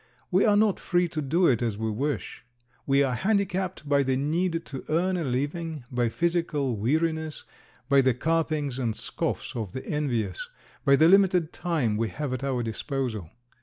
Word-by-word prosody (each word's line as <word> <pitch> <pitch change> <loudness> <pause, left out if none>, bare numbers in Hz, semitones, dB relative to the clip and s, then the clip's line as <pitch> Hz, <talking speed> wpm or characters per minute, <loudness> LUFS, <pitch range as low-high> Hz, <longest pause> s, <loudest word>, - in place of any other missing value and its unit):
We 185 +2 +4
are 205 -1 +4
not 210 -2 +3
free 175 -1 +1
to 155 - -3
do 165 +6 +2
it 125 -7 +3
as 115 -4 -1
we 110 0 -2
wish. 140 +7 -3 0.4
We 140 0 +4
are 130 -2 0
handicapped 190 - -1
by 140 0 +3
the 130 -1 +1
need 165 +4 0
to 135 -2 -7
earn 180 +4 +1
a 175 - -1
living, 145 +3 -2
by 120 -2 +1
physical 165 -4 0
weariness, 160 +7 -1 0.4
by 140 0 +5
the 130 -2 +2
carpings 155 -2 0
and 115 -4 -1
scoffs - - -3
of 110 -6 -4
the 130 - -6
envious, 120 - -2 0.3
by 140 - +5
the 155 +3 +5
limited 185 -3 +4
time 145 -12 0
we 115 0 0
have 145 -3 -4
at 130 - -4
our 130 -3 -1
disposal. 115 - -3
145 Hz, 175 wpm, -27 LUFS, 125-170 Hz, 0.4 s, by